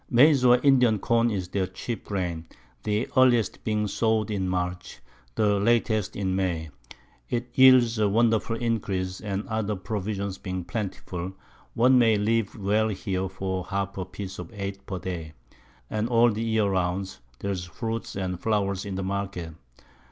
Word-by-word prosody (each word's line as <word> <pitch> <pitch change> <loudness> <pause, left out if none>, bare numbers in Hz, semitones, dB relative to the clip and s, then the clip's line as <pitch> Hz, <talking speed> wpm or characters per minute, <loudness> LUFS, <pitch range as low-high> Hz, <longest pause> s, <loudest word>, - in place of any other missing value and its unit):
Maiz 135 +2 +6
or 125 0 +7
Indian 125 -6 +5
Corn 115 +3 +2
is 95 -5 -3
their 95 -1 -1
chief 115 +5 -5
Grain, 90 -5 -3 0.3
the 105 - -1
earliest 120 -5 +3
being 105 -1 0
sow'd 110 0 0
in 95 -3 -1
March, 90 0 -3 0.4
the 105 -2 +2
latest 110 -2 +1
in 95 -2 -1
May. 85 -5 -1 0.6
It 120 0 -2
yields 125 -3 +6
a 105 -1 +3
wonderful 115 +1 +2
Increase, 100 -6 -2
and 100 -1 -3
other 110 -1 -1
Provisions 100 0 -4
being 95 -1 -4
plentiful, 95 -2 -5 0.4
one 125 +2 +5
may 115 -3 +4
live 110 +1 0
well 105 +2 +2
here 95 -2 -2
for 95 -1 -3
half 100 0 -3
a 95 - -3
Piece 95 +1 -7
of - - -7
Eight 100 -1 -5
per 95 - -3
Day, 85 -4 -5 0.5
and 110 +2 -2
all 120 0 +5
the 110 +1 -3
Year 110 -2 +1
round 95 0 -1 0.2
there's 95 0 -3
Fruit 115 +6 -5
and 90 -2 -3
Flowers 100 -3 0
in 95 - -4
the 95 - -3
Market. 95 -4 -3
100 Hz, 160 wpm, -26 LUFS, 95-115 Hz, 0.6 s, or